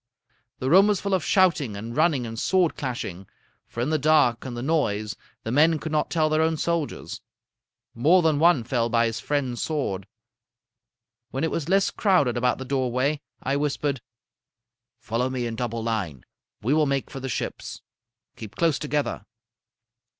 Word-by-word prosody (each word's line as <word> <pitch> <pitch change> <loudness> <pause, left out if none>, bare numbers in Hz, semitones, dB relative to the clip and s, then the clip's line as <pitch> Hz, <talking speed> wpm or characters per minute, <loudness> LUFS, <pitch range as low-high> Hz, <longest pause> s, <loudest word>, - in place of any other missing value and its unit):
The 130 +2 -2
room 195 +4 +7
was 205 -3 +2
full 200 -1 -2
of 185 -4 +1
shouting 165 - +2
and 115 +3 -6
running 150 -5 +2
and 115 0 -6
sword 185 +1 +2
clashing; 100 -8 -5 0.4
for 120 - -5
in 130 +6 0
the 155 - +2
dark 145 -5 +3
and 125 -2 -5
the 120 - -4
noise 110 -9 0 0.3
the 110 - -3
men 155 +5 +4
could 160 +1 -6
not 155 -1 0
tell 160 -2 +2
their 155 0 +2
own 160 0 +1
soldiers. 170 -2 -3 0.7
More 165 +10 +4
than 155 -3 +2
one 165 -6 +4
fell 120 -1 0
by 115 0 +3
his 115 +1 -2
friend's 130 -5 -2
sword. 100 - -2 1.2
When 135 - -3
it 160 - 0
was 165 0 -3
less 195 +1 +3
crowded 180 - +2
about 125 +1 +1
the 130 - -6
doorway, 130 +2 0 0.2
I 135 +2 0
whispered: 145 -2 -1 1.0
"'Follow 115 +3 -2
me 130 -2 -2
in 115 -1 -3
double 115 -1 -3
line. 100 - -3 0.4
We 125 +6 +2
will 155 -1 +3
make 140 -1 -1
for 135 - -6
the 135 0 -5
ships. - - -5 0.5
Keep 110 -3 -10
close 160 -5 +1
together.' 145 -7 -2
135 Hz, 170 wpm, -25 LUFS, 120-155 Hz, 1.2 s, room